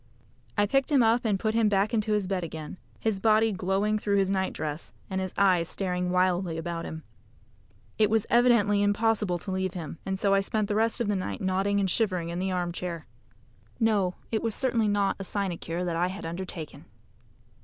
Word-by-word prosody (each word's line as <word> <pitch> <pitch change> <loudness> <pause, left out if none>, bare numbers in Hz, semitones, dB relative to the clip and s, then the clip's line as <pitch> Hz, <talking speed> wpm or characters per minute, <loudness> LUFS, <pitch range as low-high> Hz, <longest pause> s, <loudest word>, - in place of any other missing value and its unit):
I 205 - +4
picked 270 +6 +1
him 275 -4 +5
up 230 +2 +3
and 205 -3 +1
put 215 +2 0
him 225 -2 +3
back 200 +2 +1
into 215 -1 +1
his 210 -2 +1
bed 185 -1 -2
again 160 0 -7 0.2
his 220 -3 0
body 220 +1 +4
glowing 195 +3 0
through 200 -1 +1
his 195 -1 +2
night 190 -1 0
dress, 155 +1 -5 0.2
and 190 0 -1
his 185 -1 -3
eyes 180 -4 +3
staring 180 -2 -2
wildly 180 -2 +1
about 165 0 -4
him. 160 0 -7 1.0
It 215 -1 +5
was 220 -1 +2
evidently 235 -4 +4
impossible 205 -2 +1
to 190 - -7
leave 190 0 -2
him, 165 -2 -6
and 190 0 -2
so 195 +1 +2
I 195 - +5
spent 205 +1 -1
the - - +1
rest 225 +2 +1
of 235 - 0
the 205 - +1
night 185 - -3
nodding 195 +2 +1
and 195 - +1
shivering 185 -4 0
in 170 +1 -3
the 190 +1 -1
armchair. 175 -2 -3 0.7
No, 205 -6 +2 0.2
it 220 - 0
was 225 -2 0
certainly 235 -5 +1
not 205 -1 +1
a - - -4
sinecure 180 -3 -3
that 170 -2 -1
I 175 +2 +1
had 190 0 -6
undertaken. 165 -4 -6
195 Hz, 200 wpm, -27 LUFS, 180-215 Hz, 1.0 s, him